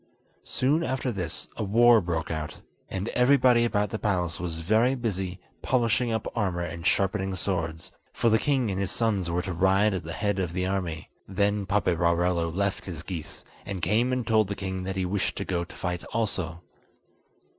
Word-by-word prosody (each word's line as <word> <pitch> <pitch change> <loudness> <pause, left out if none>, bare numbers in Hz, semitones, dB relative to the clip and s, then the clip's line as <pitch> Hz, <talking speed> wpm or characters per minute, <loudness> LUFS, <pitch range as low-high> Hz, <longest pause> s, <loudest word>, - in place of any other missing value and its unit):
Soon 145 +6 +1
after 130 -2 -1
this 90 -6 -4
a 110 - -3
war 115 +3 +6
broke 85 -3 -2
out, 75 -1 -5 0.3
and 95 +3 -3
everybody 125 -2 +4
about 105 -2 0
the 110 - -3
palace 90 -5 -1
was 85 -2 -4
very 110 +9 +3
busy 95 -7 -3 0.2
polishing 120 -1 +1
up 110 -1 -1
armour 95 -6 0
and 85 -1 -3
sharpening 95 -1 +1
swords, 80 -4 -3 0.2
for - - 0
the 110 -1 +4
king 130 -6 +1
and 95 - -2
his 100 - -1
sons 100 -6 +1
were 85 +1 0
to 95 - -3
ride 95 +4 +3
at 95 - -3
the 80 +1 -6
head 100 +4 -1
of 90 -3 -2
the 90 0 -1
army. 90 -5 -3 0.2
Then 100 +1 0
Paperarello 85 -3 +2
left 100 +3 -1
his 85 -4 -6
geese, 85 -4 -6 0.2
and 100 -2 -5
came 120 +4 +2
and 125 -2 -1
told 110 -3 +3
the 100 - -3
king 95 -1 -4
that 95 0 -3
he 95 -1 0
wished 95 +2 -1
to - - -4
go 85 -2 -1
to 85 - -12
fight 90 -1 -3
also. 90 -7 -3
95 Hz, 190 wpm, -27 LUFS, 90-110 Hz, 0.3 s, war